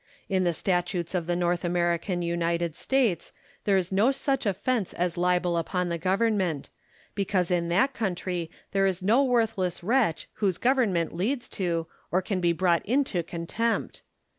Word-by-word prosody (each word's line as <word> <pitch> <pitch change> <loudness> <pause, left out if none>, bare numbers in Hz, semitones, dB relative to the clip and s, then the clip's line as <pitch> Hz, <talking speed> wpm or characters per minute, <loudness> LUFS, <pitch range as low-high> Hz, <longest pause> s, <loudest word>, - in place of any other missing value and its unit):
In 190 -2 +1
the 175 -1 +2
statutes 175 0 -1
of 175 -3 -1
the 175 - +1
North 175 0 0
American 175 +1 0
United 170 -1 -1
States, 240 -10 0 0.3
there 200 -2 +4
is 185 -1 -1
no 205 +7 +4
such 270 -2 -1
offence 205 +2 0
as 175 -1 -1
libel 180 -1 +1
upon 180 +2 -1
the 170 0 -2
Government; 190 -4 0 0.4
because 190 -3 0
in 170 -1 +1
that 200 +11 +2
countiy 180 -5 -2 0.2
there 195 -1 +3
is 185 -1 -2
no 230 +8 +4
worthless 225 -9 0
wretch 225 -5 +1
whose 195 -5 +1
government 230 -10 +1
leads 235 +10 -1
to, 170 -4 -1 0.3
or 185 +2 +2
can 195 -1 -1
be 175 -1 +3
brought 170 0 +2
into 250 -6 +1
contempt. 170 +8 -2
180 Hz, 160 wpm, -27 LUFS, 170-215 Hz, 0.4 s, there